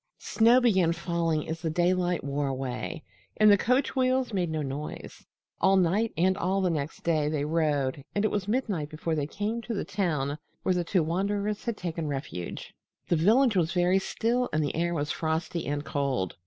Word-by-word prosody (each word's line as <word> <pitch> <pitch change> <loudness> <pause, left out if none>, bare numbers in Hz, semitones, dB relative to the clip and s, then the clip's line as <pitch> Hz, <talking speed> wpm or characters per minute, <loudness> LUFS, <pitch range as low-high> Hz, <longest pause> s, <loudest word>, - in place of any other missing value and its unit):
Snow 235 +3 +4
began 190 -9 +3
falling 170 -2 -1
as 160 +1 -4
the 165 - -1
daylight 175 +1 +1
wore 140 +1 -1
away, 130 -7 -4 0.3
and 215 -1 +7
the - - +8
coach 250 +8 +1
wheels 255 -2 +1
made 180 -4 0
no 155 -1 -2
noise. 140 +2 -7 0.3
All 195 0 +4
night 190 +5 +2
and 185 +3 +3
all 190 +1 0
the 185 -2 +1
next 150 -1 -4
day, 155 -3 +1
they 150 -2 -1
rode, 150 -4 0
and 205 +1 +1
it - - +1
was 200 -2 -2
midnight 205 - -1
before 160 +2 -3
they 150 -2 -1
came 215 +7 -3
to 230 0 -4
the - - -2
town 155 -7 -1 0.2
where 185 - +2
the 180 -1 0
two 175 0 +1
wanderers 200 +5 -1
had 235 -3 -2
taken 165 -3 -3
refuge. 135 - -5 0.4
The 175 - +3
village 220 - +4
was 175 -1 +1
very 180 +1 +3
still, 240 +5 0
and 155 0 +1
the 145 - -2
air 170 +1 0
was 145 -1 -1
frosty 160 +1 -2
and 145 +1 -2
cold. 135 - -1
170 Hz, 195 wpm, -28 LUFS, 150-200 Hz, 0.4 s, the